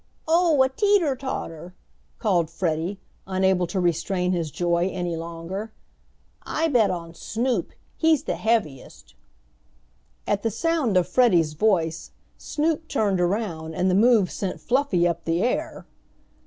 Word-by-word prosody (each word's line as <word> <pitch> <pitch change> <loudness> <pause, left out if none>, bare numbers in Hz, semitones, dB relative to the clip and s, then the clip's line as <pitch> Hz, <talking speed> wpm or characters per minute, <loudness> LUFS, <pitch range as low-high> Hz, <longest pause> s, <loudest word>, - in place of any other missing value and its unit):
"Oh, 325 -4 +4
a - - +3
teeter 360 -2 +2
tauter!" 180 - -6 0.4
called 175 -7 +1
Freddie, 170 +2 -2 0.3
unable 190 -1 +1
to 185 +3 -2
restrain 180 +1 0
his 170 -4 -1
joy 175 +4 0
any 175 -2 -3
longer. 170 +6 -6 0.7
"I 320 +1 -1
bet 240 -7 +3
on 170 -2 -5
Snoop. 230 +1 -2 0.3
He's 320 -3 +3
the - - -2
heaviest." 210 - -2 1.1
At 200 - 0
the 225 - 0
sound 270 - 0
of 180 - +2
Freddie's 175 -12 +3
voice 165 -3 0 0.3
Snoop 315 +1 -1
turned 205 - 0
around 175 -4 -2
and 185 +1 +1
the - - +1
move 215 -2 +4
sent 190 -2 -4
Fluffy 245 -10 +1
up 170 -1 -2
the 165 +2 0
air. 250 - -2
190 Hz, 135 wpm, -24 LUFS, 170-245 Hz, 1.1 s, Oh